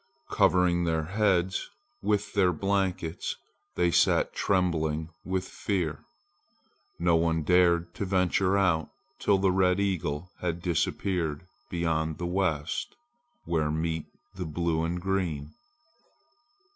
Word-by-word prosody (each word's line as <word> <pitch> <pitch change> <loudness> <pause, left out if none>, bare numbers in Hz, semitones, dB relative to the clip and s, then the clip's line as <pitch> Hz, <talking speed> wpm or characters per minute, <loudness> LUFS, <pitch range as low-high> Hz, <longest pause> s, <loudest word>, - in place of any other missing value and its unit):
Covering 90 -3 +3
their 80 -1 0
heads 95 0 +1 0.3
with 105 -1 0
their 95 -3 +4
blankets, 95 -2 -1 0.4
they 85 -1 +2
sat - - +3
trembling 80 -4 0
with 95 0 -2
fear. 85 -7 -2 0.9
No 85 0 +3
one 80 -1 +1
dared 85 0 +3
to 100 - -3
venture 95 +1 +2
out 90 -5 +2 0.3
till 100 - +3
the 95 0 +2
red 90 0 +3
eagle 90 -4 -1
had 85 -1 -3
disappeared 85 -2 -1 0.3
beyond 80 -2 -1
the 90 - -4
west, 85 -4 -1 0.5
where 80 -2 0
meet 80 +1 -2 0.3
the 95 -2 -5
blue 80 +1 -1
and 85 +2 -1
green. 85 -6 -2
85 Hz, 115 wpm, -28 LUFS, 80-95 Hz, 0.9 s, their